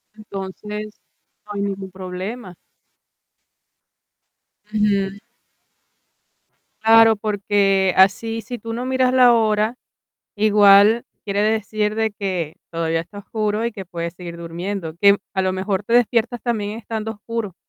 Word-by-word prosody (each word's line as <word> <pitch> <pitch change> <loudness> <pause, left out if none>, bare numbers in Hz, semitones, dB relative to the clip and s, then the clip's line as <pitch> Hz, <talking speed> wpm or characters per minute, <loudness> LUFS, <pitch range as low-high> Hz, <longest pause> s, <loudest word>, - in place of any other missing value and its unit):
Entonces, 210 +1 -7 0.4
no 210 - -8
hay 200 - -3
ningún 195 -1 -4
problema. 185 +2 -7 2.2
Ujú. 200 -2 0 1.6
Claro, 225 0 +6
porque 200 -2 +1
así 225 +4 +3
si 245 +3 -7
tú 230 0 -6
no 245 +2 -4
miras 260 -1 +1
la 250 -2 +6
hora, 215 +1 +1 0.6
igual 210 +1 +6 0.2
quiere 200 0 0
decir 215 -1 0
de 220 -1 +1
que 185 -6 -3 0.2
todavía 165 -1 -1
está 200 +5 -11
oscuro 215 +1 -2
y 235 - -1
que 195 -2 -8
puedes 170 -1 -5
seguir 170 -1 -8
durmiendo, 170 0 -5
que 200 0 +6 0.2
a 190 - +1
lo 185 0 0
mejor 190 +1 -2
te 230 +3 -1
despiertas 240 0 +2
también 215 -3 -2
estando 220 -1 -4
oscuro, 215 -3 -5
205 Hz, 125 wpm, -21 LUFS, 190-220 Hz, 2.2 s, Claro